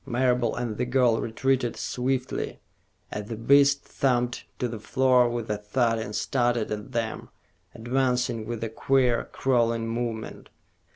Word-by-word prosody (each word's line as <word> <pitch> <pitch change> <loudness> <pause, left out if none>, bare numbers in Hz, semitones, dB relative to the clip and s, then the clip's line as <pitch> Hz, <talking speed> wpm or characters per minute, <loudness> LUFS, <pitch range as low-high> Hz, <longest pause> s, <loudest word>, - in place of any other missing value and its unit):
Marable 125 -2 +1
and 120 -3 -3
the 125 - 0
girl 125 -3 +3
retreated 120 +1 0
swiftly, 125 +2 -2 0.5
as 105 -1 -4
the 115 - -3
beast 140 +4 +4
thumped 125 -2 0
to 125 - -1
the 115 -2 -6
floor 125 +1 +3
with 120 -1 -3
a 105 - -2
thud 115 +2 +1
and 105 -1 -5
started 120 -4 0
at 105 +3 -5
them, 115 -2 -3 0.5
advancing 125 -2 0
with 115 -1 -4
a 115 - -2
queer, 125 +1 +2
crawling 115 -3 +1
movement. 115 -1 -4
120 Hz, 140 wpm, -26 LUFS, 115-130 Hz, 0.5 s, beast